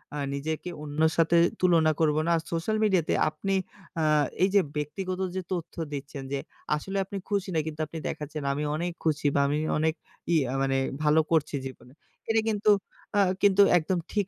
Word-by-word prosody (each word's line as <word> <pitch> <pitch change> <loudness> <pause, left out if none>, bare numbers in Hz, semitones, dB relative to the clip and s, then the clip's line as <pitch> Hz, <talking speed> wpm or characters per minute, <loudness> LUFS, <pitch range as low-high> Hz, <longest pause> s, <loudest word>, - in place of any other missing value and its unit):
আ - - -3 0.2
নিজেকে 155 +5 -3
অন্যর 155 +2 +1
সাথে 165 +1 +4 0.2
তুলনা 165 -3 +4
করব 155 -2 +3
না। 170 - +1
আর - - -2
সোশ্যাল 170 +6 0
মিডিয়াতে 190 -6 +2 0.2
আপনি 195 +6 -2 0.5
আ - - +1 0.4
এই 190 - +4
যে 200 - +7
ব্যক্তিগত 185 +5 -3 0.2
যে 190 - -1
তথ্য 175 -3 -5 0.2
দিচ্ছেন, 140 0 -6
যে 140 - 0 0.4
আসলে 195 +6 -4
আপনি 200 +1 -6
খুশি 200 -2 -1
না - - +3
কিন্তু 155 0 -6
আপনি 160 - -8
দেখাচ্ছেন 150 0 -5
"আমি 145 +2 -2
অনেক 175 +3 -2
খুশি 155 -2 +1
বা - - +4
আমি 145 +1 0 0.2
অনেক 160 +1 +2 0.4
ইয়ে 160 -4 +4 0.2
মানে 135 0 +1 0.3
ভালো 150 +1 +4
করছি 155 -2 +2
জীবনে।" 130 -1 -13 0.4
এটা 225 0 +3
কিন্তু 210 0 +3 0.5
আ - - +6 0.2
কিন্তু 200 -1 +5 0.2
একদম 175 +2 0
ঠিক 205 -3 0
160 Hz, 180 wpm, -27 LUFS, 150-190 Hz, 0.5 s, যে